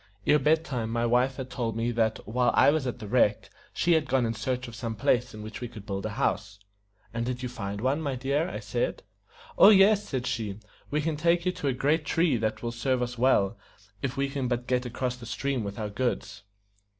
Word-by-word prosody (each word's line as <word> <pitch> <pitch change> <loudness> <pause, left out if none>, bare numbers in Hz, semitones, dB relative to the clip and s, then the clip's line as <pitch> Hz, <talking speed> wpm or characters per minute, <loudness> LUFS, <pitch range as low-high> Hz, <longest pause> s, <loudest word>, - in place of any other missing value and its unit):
Ere 150 - +5
bed 160 +3 +2
time 120 -7 -3
my 115 +1 0
wife 125 +3 +2
had 130 -1 -7
told 115 -3 -2
me 115 +1 0
that 110 -2 +1
while 125 +3 +2
I - - +6
was 150 -3 0
at 125 - -3
the 110 -3 -8
wreck 105 -2 +2 0.2
she 175 - +1
had 155 -3 +2
gone 130 -2 +2
in 115 - -1
search 130 +2 -3
of 120 - -9
some 115 0 -4
place 125 0 +1
in 105 - -8
which 110 +2 -8
we 120 - -3
could 110 -4 -11
build 100 0 -3
a 105 - -7
house. 100 +1 -1 0.6
"And 115 0 -2
did 125 +1 -3
you 125 - -2
find 100 -3 -5
one, 135 +5 +1
my 140 -4 -2
dear?" 140 +6 0
I - - -5
said. - - -2 0.6
"Oh, 195 - +10
yes," 205 0 +5
said 130 -3 -2
she. 115 -6 -3 0.3
"We 150 +1 0
can 155 0 -1
take 170 +2 +2
you 180 - +2
to 145 - -4
a 135 - +2
great 150 +5 +1
tree 165 -1 +2
that 110 0 -2
will 120 - -2
serve 125 +2 0
us 120 -1 -5
well, 115 -5 +3 0.4
if 135 0 -3
we 140 0 +1
can 135 -2 -2
but 120 0 -1
get 125 0 0
across 125 +1 -3
the 120 -2 -10
stream 135 0 -2
with 100 0 -5
our 105 -2 -4
goods." 120 -2 -2
125 Hz, 235 wpm, -28 LUFS, 115-140 Hz, 0.6 s, Oh